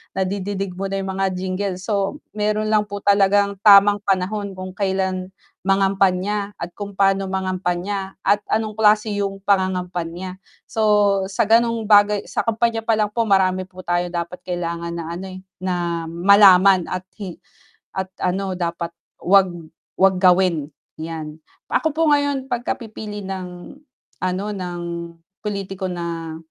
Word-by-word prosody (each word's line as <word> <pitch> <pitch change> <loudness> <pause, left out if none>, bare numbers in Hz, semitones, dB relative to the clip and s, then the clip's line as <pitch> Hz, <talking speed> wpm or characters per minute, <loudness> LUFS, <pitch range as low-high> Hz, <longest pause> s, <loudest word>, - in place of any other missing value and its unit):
nadidinig 195 0 -2
mo 195 - -1
na 195 - -3
yung 190 - -3
mga 195 0 0
jingle 185 +1 -2
so, 200 +7 -2
meron 215 +1 -1
lang 210 -1 +2
po 205 0 -7
talagang 200 0 +3
tamang 205 0 +7
panahon 195 +1 -1
kung 185 0 -6
kailan 190 -1 -1 0.4
mangampanya 195 +1 +1
at 170 +1 -6
kung 200 0 -8
pa'no 195 0 +2
mangampanya 190 +1 -2
at 205 - +3
anong 215 0 0
klase 210 0 +4
yung 195 -1 -3
pangangampanya. 185 -2 -1 0.2
So 220 - -4 0.5
sa 195 - 0
ganong 230 +1 +3
bagay 205 -1 +4
sa - - -4
kampanya 230 0 +1
palang 215 -2 +2
po 230 0 0
marami 185 -1 +2
po 185 -1 -12
tayong 175 0 -1
dapat 170 +1 -4
kailangan 170 -1 -3
na 170 - -4
ano, 185 +3 -6
eh, 185 0 -9 0.2
na 175 -3 -2
malaman 190 +1 +6
at 185 0 -4 0.2
hi 190 -4 -6 0.6
at 190 0 -3
ano 190 +1 -1
dapat 170 -1 -3 0.3
'wag 190 0 +5 0.5
'wag 190 0 +4
gawin 180 -5 +3 0.3
yan. 160 -1 -6 0.3
Ako 315 - +2
po 325 - +3
ngayon 285 -2 +1
pag 245 -3 -2
ka - - -1
pipili 210 -3 -8
ng 180 -2 -7 0.5
ano, 185 +2 -1
ng 180 -3 -5 0.6
pulitiko 195 -2 -4
na, 170 -2 -5
190 Hz, 145 wpm, -21 LUFS, 180-205 Hz, 0.6 s, tamang